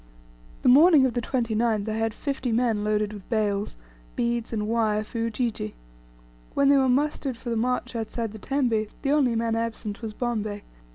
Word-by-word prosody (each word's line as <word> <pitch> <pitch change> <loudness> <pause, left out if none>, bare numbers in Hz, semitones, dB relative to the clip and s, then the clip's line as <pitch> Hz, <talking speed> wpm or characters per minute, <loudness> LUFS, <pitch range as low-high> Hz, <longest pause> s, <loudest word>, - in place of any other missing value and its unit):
The - - +2
morning 290 +2 +7
of 255 - 0
the 240 - -1
29th 225 -3 0
I 215 - -1
had 225 0 0
fifty 270 -4 -3
men 225 -2 +1
loaded 210 0 0
with 205 -3 -11
bales, 205 - -1 0.4
beads, 235 -1 -1
and 210 -2 -2
wire, 215 -2 +1
for 230 +2 -6
Ujiji. 230 - -2 0.8
When 280 0 +4
they 280 - +6
were 265 -1 +3
mustered 275 -1 0
for 240 0 -6
the - - 0
march 250 +2 -1
outside 225 0 -3
the 220 - -10
tembe, 240 -4 0 0.2
the 275 - +1
only 270 -5 +3
man 225 0 0
absent 225 -2 -3
was 220 -2 -5
Bombay. 215 -4 -2
230 Hz, 180 wpm, -26 LUFS, 215-250 Hz, 0.8 s, morning